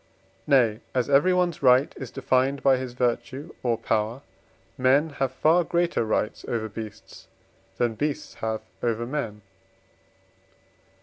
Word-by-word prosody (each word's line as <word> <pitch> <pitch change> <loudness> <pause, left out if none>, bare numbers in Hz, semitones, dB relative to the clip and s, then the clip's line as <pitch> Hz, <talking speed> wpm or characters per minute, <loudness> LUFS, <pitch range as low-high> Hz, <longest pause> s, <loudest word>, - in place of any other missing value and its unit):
Nay, 120 -7 +4 0.2
as 125 +2 0
everyone's 175 +3 +3
right 130 +1 +5
is 130 - -7
defined 135 +1 0
by 135 -1 +5
his 130 -1 -5
virtue, 130 +4 -2
or 120 -2 +1
power, 115 +3 -1 0.5
men 140 +4 +3
have 135 -2 -1
far 170 +3 +3
greater 170 -4 0
rights 110 -1 -1
over 110 -2 -2
beasts 110 0 -10 0.5
than 120 -2 +1
beasts 145 +5 -3
have 110 -1 -2 0.2
over 120 -1 -1
men. 115 -6 -4
130 Hz, 125 wpm, -25 LUFS, 115-145 Hz, 0.5 s, right